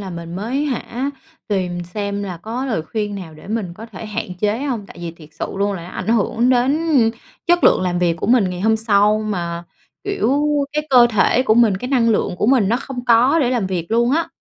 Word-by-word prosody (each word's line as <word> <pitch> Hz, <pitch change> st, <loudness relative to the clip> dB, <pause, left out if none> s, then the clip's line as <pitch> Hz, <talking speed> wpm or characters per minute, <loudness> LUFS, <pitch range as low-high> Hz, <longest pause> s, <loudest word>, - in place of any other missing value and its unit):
là 195 Hz, -2 st, -6 dB
mình 170 Hz, 0 st, -7 dB
mới 250 Hz, +9 st, -2 dB
hả, 260 Hz, 0 st, -3 dB, 0.4 s
tìm 180 Hz, -3 st, -1 dB
xem 200 Hz, +2 st, -4 dB
là 185 Hz, -3 st, -5 dB
có 230 Hz, +9 st, -5 dB
lời 220 Hz, -10 st, -1 dB
khuyên 205 Hz, +4 st, -3 dB
nào 170 Hz, -5 st, -8 dB
để 155 Hz, -, -14 dB
mình 205 Hz, -6 st, -3 dB
có 225 Hz, +3 st, -10 dB
thể 225 Hz, -, -9 dB
hạn 190 Hz, -3 st, -4 dB
chế 210 Hz, +2 st, +1 dB
hông, 235 Hz, -8 st, -3 dB
tại 245 Hz, -, -14 dB
vì 170 Hz, -1 st, -4 dB
thiệt 160 Hz, -2 st, -15 dB
sự 150 Hz, -, -4 dB
luôn 200 Hz, +1 st, 0 dB
là 180 Hz, -, -6 dB
nó 170 Hz, -, -9 dB
ảnh -, -, -6 dB
hưởng 230 Hz, +2 st, +2 dB
đến 260 Hz, +4 st, +3 dB, 0.7 s
chất 350 Hz, 0 st, +3 dB
lượng -, -, +5 dB
làm 180 Hz, -1 st, -1 dB
việc 170 Hz, -2 st, +1 dB
của -, -, -4 dB
mình 225 Hz, -5 st, +3 dB
ngày 180 Hz, 0 st, -5 dB
hôm 220 Hz, +2 st, +3 dB
sau. 210 Hz, -1 st, +3 dB
Mà, 170 Hz, -5 st, -3 dB, 0.4 s
kiểu, 400 Hz, -10 st, 0 dB, 0.4 s
cái 300 Hz, 0 st, -2 dB
cơ 245 Hz, -2 st, +7 dB
thể 220 Hz, +4 st, +3 dB
của 220 Hz, -4 st, +3 dB
mình, 230 Hz, -5 st, +4 dB
cái 250 Hz, +6 st, -5 dB
năng 245 Hz, -4 st, +2 dB
lượng 200 Hz, -4 st, 0 dB
của 210 Hz, -, 0 dB
mình 240 Hz, -7 st, +4 dB
nó 235 Hz, -, +2 dB
không 255 Hz, -2 st, -6 dB
có 245 Hz, +6 st, +4 dB
để 250 Hz, -, +1 dB
làm 235 Hz, -7 st, 0 dB
việc 175 Hz, -3 st, -3 dB
luôn 235 Hz, +2 st, +2 dB
á. 330 Hz, +4 st, +1 dB
215 Hz, 235 wpm, -19 LUFS, 185-245 Hz, 0.7 s, cơ